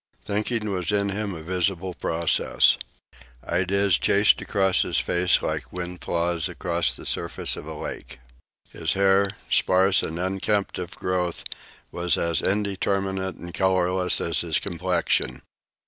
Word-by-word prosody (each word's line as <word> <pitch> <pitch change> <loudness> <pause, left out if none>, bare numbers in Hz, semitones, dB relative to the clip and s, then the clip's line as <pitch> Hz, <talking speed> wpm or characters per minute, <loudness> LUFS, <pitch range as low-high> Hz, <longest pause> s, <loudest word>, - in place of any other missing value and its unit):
Thinking 105 +2 -1
was 90 -2 -2
in 100 -1 +1
him 100 -1 -3
a 80 - -8
visible 90 +1 -1
process. 85 -1 +3 0.7
Ideas 95 +1 +2
chased 100 +1 +4
across 95 -3 +2
his - - 0
face 90 0 +2
like - - -3
wind 90 0 -6
flaws 85 -1 -1
across - - 0
the - - -9
surface 85 0 -2
of - - -9
a - - -6
lake. 70 - -7 0.5
His 80 -1 -1
hair, 100 0 +3 0.2
sparse 95 +1 +3
and 80 - -4
unkempt 95 +3 -1
of 90 +1 -6
growth, 90 -2 -2 0.5
was 85 0 +2
as 85 -1 +1
indeterminate 95 -1 -1
and 85 0 -10
colorless 95 -1 +2
as 85 - -1
his 80 -3 0
complexion. 90 -2 -1
95 Hz, 135 wpm, -24 LUFS, 85-100 Hz, 0.7 s, chased